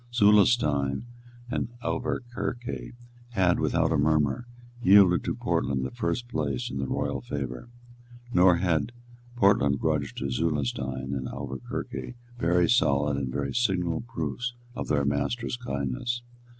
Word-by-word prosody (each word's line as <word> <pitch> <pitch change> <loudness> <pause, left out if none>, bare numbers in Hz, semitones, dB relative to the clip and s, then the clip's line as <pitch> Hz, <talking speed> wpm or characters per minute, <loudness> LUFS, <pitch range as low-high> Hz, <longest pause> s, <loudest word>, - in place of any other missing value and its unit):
Zulestein 100 - +4 0.4
and 120 - -2
Auverquerque 120 0 -3 0.4
had, 90 -5 +3
without - - +1
a 80 - +2
murmur, 75 - +2 0.3
yielded 95 -4 +6
to - - -1
Portland 65 0 0
the - - -4
first 120 0 -2
place 75 - -2
in 65 - -4
the 65 - -2
royal - - -2
favour; 70 - -5 0.6
nor 90 0 +6
had 90 +5 0 0.4
Portland 95 - +4
grudged 75 -3 -1
to 70 +1 -2
Zulestein 65 -3 -1
and 65 -2 -3
Auverquerque 65 - -5 0.2
very 85 -1 +3
solid 75 - +3
and 70 -2 -2
very 70 +1 -2
signal 90 -8 +1
proofs 120 +1 -4 0.2
of - - -5
their 70 -2 +1
master's 70 - -1
kindness. 120 - -3
80 Hz, 125 wpm, -27 LUFS, 70-115 Hz, 0.6 s, yielded